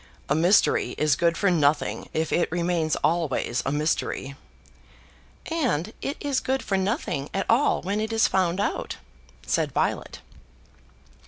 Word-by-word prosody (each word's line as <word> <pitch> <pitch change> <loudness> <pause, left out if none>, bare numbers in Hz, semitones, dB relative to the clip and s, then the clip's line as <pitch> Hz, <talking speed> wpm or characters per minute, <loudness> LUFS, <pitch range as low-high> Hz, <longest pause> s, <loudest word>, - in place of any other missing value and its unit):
A - - +3
mystery 175 +6 +3
is 150 -1 +3
good 170 +1 +1
for 200 -2 +2
nothing 150 -3 +1
if 160 0 -1
it 175 - +1
remains 170 -2 0
always 150 -7 0
a - - +1
mystery." 145 -2 -1 1.1
"And 240 - -1
it 280 - -3
is 280 -2 0
good 265 +1 -1
for 195 - -1
nothing 190 - -1
at 195 - 0
all 245 +6 +2
when 200 +3 -1
it 220 +1 -3
is 225 0 +3
found 185 -1 +1
out," 205 - -2 0.5
said - - 0
Violet. - - -2
175 Hz, 145 wpm, -25 LUFS, 155-215 Hz, 1.1 s, A